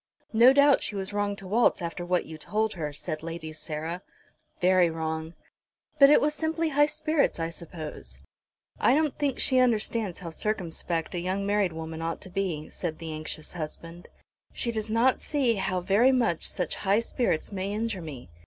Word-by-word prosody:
"No 235 +3 +8
doubt 280 0 +5
she 210 - -3
was 195 0 -3
wrong 205 0 0
to 195 - -12
waltz 230 +5 +3
after 175 0 -4
what 180 0 0
you 160 - -8
told 215 +8 -1
her," 155 -4 -4
said 155 +2 -5
Lady 165 -1 -6
Sarah. 160 +3 -5 0.6
"Very 180 -1 +4
wrong." 160 0 -4 0.6
"But 275 -1 +9
it 295 - +7
was 300 +1 +1
simply 320 +1 -1
high 290 0 +4
spirits, 305 - 0
I 165 0 -2
suppose." 165 -2 -8 0.6
"I - - +4
don't 305 -2 +1
think 285 -3 0
she 260 -1 +2
understands 225 -5 +1
how 170 -3 -7
circumspect 170 -3 -2
a 175 - -2
young 190 +3 -2
married 200 -2 +2
woman 160 0 -6
ought 165 0 -2
to 190 - -10
be," 180 -6 -2
said 160 -3 -4
the 165 -1 -6
anxious 155 0 -6
husband. 165 +1 -6 0.5
"She 235 - -1
does 220 -1 -3
not 235 +4 +3
see 275 -6 +1
how 185 -1 -1
very 200 +8 +4
much 235 -10 +1
such 180 - -2
high 200 +3 +3
spirits 230 -8 -1
may 195 0 -3
injure 215 -2 -2
me. 135 - -9
190 Hz, 180 wpm, -27 LUFS, 165-230 Hz, 0.6 s, But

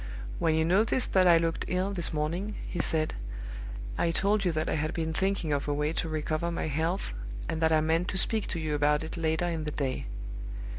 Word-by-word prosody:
"When 160 -1 +3
you 160 0 +3
noticed 215 +8 +2
that 185 -1 +6
I 170 -1 +8
looked 165 0 0
ill 185 +2 0
this 175 -4 +2
morning," 170 +7 -2
he 175 - -4
said, 155 -2 +1 0.9
"I 170 - +3
told 200 +4 +2
you 180 - +2
that 155 0 -1
I - - 0
had 155 0 -1
been 160 -1 -1
thinking 190 -3 0
of 140 0 -1
a 145 - +1
way 150 +2 0
to 165 - -2
recover 155 +2 -1
my 170 - -2
health, 160 - -1 0.3
and 160 - -2
that 160 0 +4
I 155 -1 +5
meant 165 +3 +1
to 190 - -1
speak 220 +2 +2
to 170 - -3
you 155 -1 -1
about 150 +1 +3
it 160 - -5
later 160 0 0
in 165 -2 -1
the 155 - -2
day. 135 - -2
160 Hz, 220 wpm, -29 LUFS, 155-180 Hz, 0.9 s, I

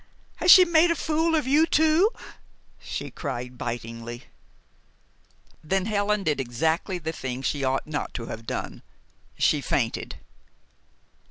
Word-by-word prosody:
Has 355 - 0
she 365 +1 +10
made 340 0 +4
a 335 - +2
fool 320 +2 0
of 305 - 0
you 300 +5 +4
too?" 320 +5 +4 0.7
she - - -6
cried 125 -4 -5
bitingly. 120 0 -6 1.4
Then 190 +4 0
Helen 210 -1 0
did 150 -5 0
exactly 160 +9 -1
the 160 -2 -4
thing 130 -3 -5
she 140 0 -1
ought 130 0 0
not 150 -1 -4
to 115 - -4
have 115 0 -8
done. - - -5 0.6
She - - +2
fainted. - - -2
160 Hz, 135 wpm, -25 LUFS, -, 1.4 s, she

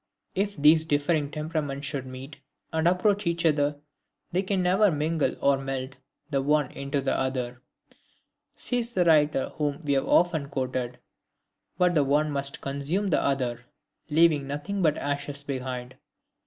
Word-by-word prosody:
"If 200 0 -1
these 155 +2 +6
differing 145 0 +1
temperaments 150 -2 -3
should 135 -2 -3
meet 130 +3 -9 0.4
and 160 +1 +2
approach 195 +2 +2
each 170 0 0
other, 145 -2 +2 0.6
they 180 - +1
can 190 -1 0
never 195 +4 +4
mingle 155 0 0
or 140 -1 +3
melt 135 -1 -4 0.4
the 135 -1 +1
one 145 -1 +1
into 140 0 -2
the 135 - 0
other," 125 -2 -2 0.9
(says 240 -1 -1
the 180 -2 +2
writer 150 -4 +3
whom 145 -2 -1
we 145 -1 +1
have 135 - +1
so - - -7
often 160 -5 +3
quoted) 130 -2 -3 0.8
"but 180 -1 +3
the 150 -4 +3
one 150 +2 +2
must 140 -1 -2
consume 140 +9 -1
the - - +2
other, 125 -4 -1 0.5
leaving 155 -2 +3
nothing 150 +8 -3
but 155 -3 +3
ashes 145 0 -3
behind." 130 -2 -5
145 Hz, 155 wpm, -27 LUFS, 135-165 Hz, 0.9 s, these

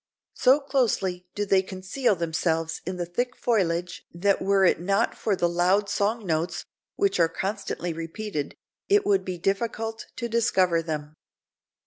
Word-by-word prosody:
So 265 +3 +4
closely 210 -10 0
do 205 - -1
they 195 -1 +4
conceal 190 +5 -1
themselves 165 -1 -1
in 185 0 -3
the 175 - -2
thick 245 +9 -2
foliage 180 -6 0
that 195 +4 +1
were 195 0 +3
it 175 - +3
not 200 +6 +1
for 210 - 0
the 175 - +1
loud 180 +4 +2
song 210 +2 0
notes, 165 0 -1 0.3
which 195 -2 +1
are 165 -1 +4
constantly 190 -2 -3
repeated, 165 -1 -5 0.3
it 405 0 +4
would 400 -1 +3
be 180 -1 -4
difficult 225 +4 -2
to 235 - -3
discover 190 -7 +2
them." 155 -2 -5
190 Hz, 150 wpm, -26 LUFS, 170-220 Hz, 0.3 s, So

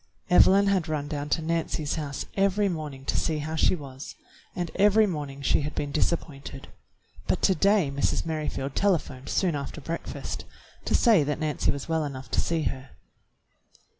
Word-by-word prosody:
Evelyn 195 +2 +6
had 195 -4 +1
run 150 -2 -2
down 145 0 -4
to 160 - +1
Nancy's 160 -2 -1
house 145 -4 -4
every 200 +1 +2
morning 150 -7 -5
to - - -1
see 160 -2 +1
how 155 +2 -4
she 160 - +3
was, 135 -4 -9 0.4
and 175 -2 -3
every 210 +2 +5
morning 145 -7 -4
she - - +3
had 150 +1 -4
been 145 - -2
disappointed, 140 -3 -2 0.6
but - - 0
to 190 - +5
day 195 -4 +3
Mrs. 140 +4 0
Merrifield 150 -4 -3
telephoned 165 -9 0
soon 180 -4 +1
after 140 +1 -5
breakfast 165 +3 -5 0.4
to - - +2
say 220 - +5
that 145 0 -1
Nancy 155 -3 0
was 140 -1 -1
well 160 -1 +1
enough 130 -4 -6
to - - +2
see 165 -2 -1
her. 130 -1 -4
155 Hz, 170 wpm, -27 LUFS, 140-175 Hz, 0.6 s, Evelyn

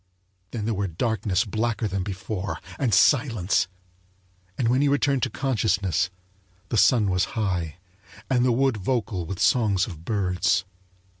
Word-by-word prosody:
Then 110 -3 -4
there 115 - 0
were 100 -1 -1
darkness 105 +3 0
blacker 110 +1 -1
than 100 -1 -2
before, 95 +1 -4 0.2
and 130 -5 +1
silence; 110 - +3 0.9
and 120 - +1
when 125 +3 +3
he 145 - +3
returned 140 -1 +2
to - - 0
consciousness 100 - 0 0.6
the - - -1
sun 105 -2 +4
was 90 +4 -1
high 90 -7 -1 0.5
and 125 -2 +2
the 125 - +3
wood 130 0 +2
vocal 100 -5 -2
with 95 - -4
songs 100 -1 +3
of 80 -5 -9
birds. 90 -2 0
105 Hz, 145 wpm, -25 LUFS, 95-120 Hz, 0.9 s, sun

